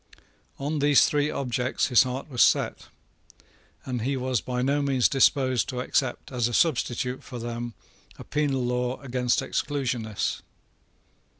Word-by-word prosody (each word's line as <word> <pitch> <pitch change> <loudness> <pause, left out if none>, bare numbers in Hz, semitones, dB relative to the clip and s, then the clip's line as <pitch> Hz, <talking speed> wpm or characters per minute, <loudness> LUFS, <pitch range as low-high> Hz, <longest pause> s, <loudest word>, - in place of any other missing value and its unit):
On 145 +2 -2
these 145 -1 +5
three 145 0 +1
objects 125 -1 -1
his 125 -1 +6
heart 130 0 -2
was 125 -5 -1
set; - - +2 1.0
and 125 -3 -3
he 135 +4 -1
was 130 -4 -1
by 125 +5 -2
no 140 +2 +1
means 135 -3 +3
disposed 130 -2 +2
to 125 -3 -4
accept 130 +1 -1
as 120 -3 0
a 120 - -2
substitute 125 -4 0
for 125 - -8
them 120 0 -5 0.4
a - - -9
penal 140 -4 -1
law 125 +1 -1
against 125 -2 0
Exclusionists. 120 -7 -2
130 Hz, 140 wpm, -26 LUFS, 125-140 Hz, 1.0 s, his